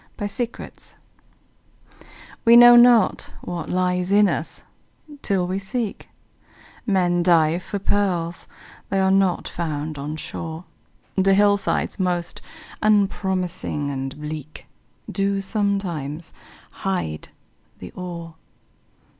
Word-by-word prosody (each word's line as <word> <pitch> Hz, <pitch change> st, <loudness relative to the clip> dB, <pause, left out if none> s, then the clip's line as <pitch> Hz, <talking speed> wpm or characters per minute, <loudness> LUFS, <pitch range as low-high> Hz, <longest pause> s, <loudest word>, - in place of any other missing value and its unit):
HIDDEN 205 Hz, +4 st, -2 dB
GEMS -, -, -12 dB, 1.5 s
We 230 Hz, 0 st, +7 dB
know 240 Hz, 0 st, +10 dB
not 240 Hz, -1 st, +5 dB
what 175 Hz, -3 st, -5 dB
lies 180 Hz, 0 st, 0 dB
in 205 Hz, 0 st, +5 dB
us, 165 Hz, -2 st, -3 dB, 0.6 s
till 190 Hz, -3 st, 0 dB
we 185 Hz, +2 st, -2 dB
seek; 215 Hz, +2 st, -4 dB, 0.8 s
Men 180 Hz, -3 st, +2 dB
dive 170 Hz, -1 st, +3 dB
for 200 Hz, -, -5 dB
pearls—they 190 Hz, -1 st, -3 dB
are 190 Hz, 0 st, +3 dB
not 190 Hz, -2 st, +2 dB
found 155 Hz, -3 st, -4 dB
on 150 Hz, +2 st, -4 dB
shore, 160 Hz, +1 st, -7 dB, 0.5 s
The 195 Hz, 0 st, +3 dB
hillsides 205 Hz, 0 st, +1 dB
most 175 Hz, -2 st, -1 dB, 0.4 s
unpromising 190 Hz, -7 st, 0 dB
and 135 Hz, +1 st, -5 dB
bleak 150 Hz, 0 st, -7 dB, 0.4 s
Do 195 Hz, 0 st, -1 dB
sometimes 190 Hz, -7 st, -2 dB, 0.4 s
hide 180 Hz, -, -3 dB, 0.5 s
the 90 Hz, -, -10 dB
ore. 170 Hz, -2 st, -7 dB
180 Hz, 100 wpm, -22 LUFS, 165-200 Hz, 1.5 s, know